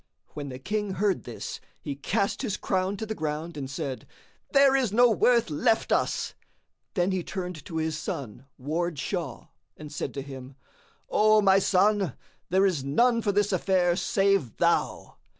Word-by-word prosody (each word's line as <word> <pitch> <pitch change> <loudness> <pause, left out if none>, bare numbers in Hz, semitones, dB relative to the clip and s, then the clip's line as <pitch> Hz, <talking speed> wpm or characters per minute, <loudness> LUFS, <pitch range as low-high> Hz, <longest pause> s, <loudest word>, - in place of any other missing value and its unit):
When 145 -1 -6
the 125 - -6
King 205 +8 -2
heard 195 0 0
this, - - -6 0.2
he 145 - -4
cast 195 +8 -1
his 210 -6 -2
crown 190 +1 -1
to 220 - -4
the 220 - -3
ground 155 -1 -4
and 135 -3 -5
said, 135 -2 -5 0.4
"There 275 -1 +5
is 255 -6 +1
no 240 +2 +5
worth 235 -2 +3
left 185 +9 +1
us!" - - 0 0.6
Then 180 0 +2
he 185 -2 -1
turned 180 -5 -5
to 160 - -5
his 160 -1 -1
son 135 - -6
Ward 160 +5 -2
Shah[FN#63] 150 - -4 0.3
and 150 -1 -9
said 145 - -4
to 140 - -4
him, 135 -1 -9 0.5
"O 215 0 +4
my 195 0 +6
son, 195 -3 +2 0.3
there 190 +2 +4
is 170 -9 +1
none 230 - +3
for 205 - +1
this 205 +1 +1
affair 180 -1 +2
save 195 - +1
thou." - - 0
185 Hz, 170 wpm, -27 LUFS, 150-205 Hz, 0.6 s, my